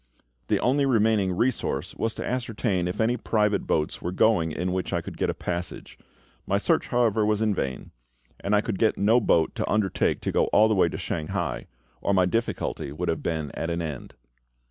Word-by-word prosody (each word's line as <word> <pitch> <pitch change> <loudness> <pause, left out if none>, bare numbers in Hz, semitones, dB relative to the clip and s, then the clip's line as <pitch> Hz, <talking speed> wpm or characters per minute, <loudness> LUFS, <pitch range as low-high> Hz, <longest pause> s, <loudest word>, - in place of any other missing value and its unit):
The - - +2
only 135 +3 +2
remaining 110 -5 +3
resource 95 - -1
was 115 0 -2
to - - -5
ascertain 115 -7 -1
if 90 - -4
any 115 +2 +2
private 105 -3 0
boats 75 -1 0
were 90 - -3
going 90 -4 +2
in 90 +3 -2
which 95 0 -2
I - - +2
could - - -8
get - - -1
a - - 0
passage. 90 0 -5 0.5
My - - +2
search, - - +1
however, 115 -3 +2
was 105 +1 +1
in 110 -1 +2
vain; 65 -8 -4 0.5
and 100 +1 +1
I 105 - +4
could 105 -3 -3
get 110 - +2
no 110 +5 +4
boat 85 -6 +2
to - - -3
undertake 105 -3 +1
to - - -2
go - - +2
all 110 - +4
the 110 - +2
way 95 -4 +3
to - - -5
Shanghai, 75 - -3 0.3
or 100 - +1
my 95 -1 +4
difficulty 115 -8 -2
would 85 +4 -3
have 80 - -1
been 80 -3 -2
at 80 - -4
an 85 0 -1
end. 75 -5 -6
100 Hz, 205 wpm, -26 LUFS, 85-110 Hz, 0.5 s, I